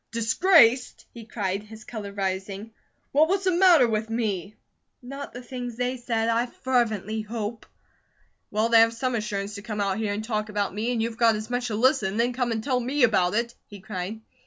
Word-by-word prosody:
"'Disgraced?'" 245 - +3
he 235 - -9
cried, 200 -3 -2
his 215 +1 -12
colour 215 -4 -7
rising. 195 +2 -4 0.4
"Well, 305 +3 +5
what's 385 +2 0
the 375 - +2
matter 345 -7 +6
with 220 0 -1
me?" 215 -3 -2 0.4
"Not 275 +3 -8
the 245 +1 -9
things 245 -1 -6
they 250 +1 -1
said, 230 -2 -1
I 230 +2 +1
fervently 220 -5 -1
hope." 220 +1 -5 0.8
"Well, 215 +2 0
they 230 -1 +7
have 230 0 +5
some 255 +1 -1
assurance 210 -2 -3
to 200 - -7
come 210 0 -5
out 200 0 0
here 215 -2 -1
and 210 +1 -4
talk 215 -1 -2
about 205 -2 -1
me, 220 +4 -1
and 230 -2 0
you've 230 0 -4
got 230 -2 +5
as 215 +2 -6
much 245 0 -1
to 220 - -3
listen, 225 -4 +2
and 215 - -3
then 240 +1 +2
come 245 -1 -1
and 220 -1 -2
tell 255 -1 +1
me 260 +3 0
about 205 -5 +3
it," 235 +1 -1
he 205 - -11
cried. 190 +3 -6
225 Hz, 205 wpm, -25 LUFS, 210-245 Hz, 0.8 s, they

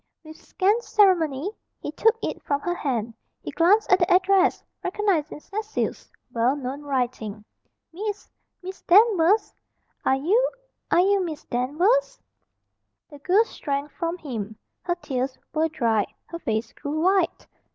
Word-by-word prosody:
With 315 0 -11
scant 410 +5 +1
ceremony 365 - +2 0.3
he - - -5
took 450 +9 +2
it - - -3
from 285 -1 -1
her 350 - -1
hand. 240 -9 -2 0.3
He - - -5
glanced 390 +6 +3
at 370 - +6
the 355 +1 +1
address 380 +1 +3 0.2
recognising 365 -6 -1
Cecil's 430 +4 -4 0.2
well 240 +4 +2
known 275 0 -5
writing. 240 -7 -3 0.5
"Miss 415 +3 -5 0.4
Miss 375 +1 -8
Danvers! 405 0 +4 0.5
Are 265 - +3
you 405 - +2 0.4
are 350 - +4
you 395 +1 +3
Miss 315 -3 -5
Danvers?" 330 - +1 0.9
The 290 - -11
girl 375 +9 +4
shrank 285 -8 -4
from 335 0 -3
him. 220 - -6 0.2
Her 350 - -1
tears 260 -5 -3 0.2
were 320 +1 +1
dried. 230 -9 +1 0.2
Her 335 - -8
face 225 -4 -2
grew 295 +2 -4
white. 375 0 +1
330 Hz, 140 wpm, -24 LUFS, 270-390 Hz, 0.9 s, at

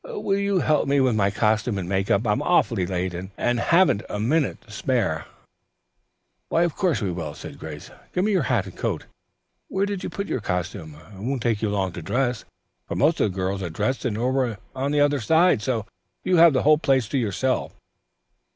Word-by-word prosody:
Will 420 - -2
you 200 -2 +1
help 155 -1 +2
me 140 0 +3
with 130 -4 +3
my 100 -2 +2
costume 105 +1 +1
and 90 -3 -4
make 95 +1 -1
up? 100 +4 +2
I'm 105 +5 +1
awfully 120 - +2
late, 90 0 -2 0.2
and 120 -1 +1
haven't 170 - +3
a 105 - -3
minute 135 +6 +1
to 115 - -17
spare." 105 - -1 1.2
"Why 165 - +3
of 170 -3 -1
course 180 - 0
we 95 - 0
will," 80 -4 -5
said - - -10
Grace. 75 -1 -8 0.2
"Give 180 - 0
me 215 - +1
your 190 -4 +3
hat 115 -7 +2
and 95 - -10
coat, - - -2
dear. - - -19 0.6
Where 195 +1 0
did 200 -2 -4
you - - -3
put 200 - -4
your 130 - -3
costumes? 90 -4 -4 0.2
It 95 - -11
won't 125 +2 -2
take 115 -3 0
you 110 - 0
long 95 -2 -1
to 90 - -7
dress, 125 -2 -1 0.4
for - - -4
most 155 +4 +2
of 105 - +2
the - - -11
girls 95 +1 -1
are 90 - -3
dressed 130 +11 -2
and 110 -5 -1
over 125 -2 0 0.2
on 135 +2 -1
the 150 -1 +2
other 145 -1 +3
side, 160 +2 +3
so 115 -1 -1 0.4
you 185 - +2
have 165 -2 +7
the 150 +3 +4
place 135 -6 +2
to 135 - 0
yourself." 125 +4 -1
120 Hz, 215 wpm, -24 LUFS, 100-150 Hz, 1.2 s, have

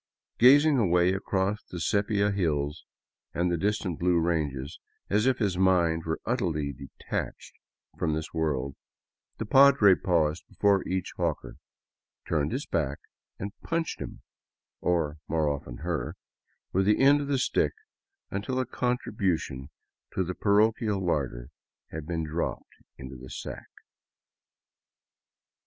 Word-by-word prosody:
Gazing 145 +3 +7
away 90 -3 +3
across 95 +2 -1
the 90 - -8
sepia 100 +3 +1
hills 75 -6 -1 0.5
and 85 0 +1
distant 100 -5 -1
blue 90 0 +3
ranges, 75 -4 -1 0.3
as 105 +4 +3
if 130 -1 +3
his 100 -6 0
mind 85 -4 +3
were 80 0 -2
utterly 80 - -1
detached 70 +1 -6 0.5
from 75 - +1
this 80 0 -5
world, 70 -5 -1 0.6
the 110 - -3
padre 135 -4 +7
paused 85 -4 +1
before 100 -2 +2
each 95 0 -2
hawker, - - -2 0.7
turned 75 -3 0
his 130 +5 -2
back, 75 -4 -1 0.4
and 100 +2 -5
punched 165 -1 -2
him - - -7 0.3
— - - -64
or, 80 -4 0
more 80 -1 +1
often, 70 -4 -3
her 85 -2 -2 0.3
— - - -47
with 95 +1 +2
the 105 - +4
end 140 +2 +6
of 140 - -4
the 140 -1 +1
stick 130 - +1 0.6
until 105 +7 -2
a 130 - 0
contribution 95 - -2 0.5
to 95 - +2
the 90 +1 -3
parochial 105 +1 +2
larder 65 -9 -2 0.4
had 80 -1 -6
been 85 -2 -2
dropped 80 +2 -3 0.2
into 65 0 -8
the 65 0 -11
sack. - - -7
90 Hz, 135 wpm, -28 LUFS, 75-105 Hz, 0.7 s, Gazing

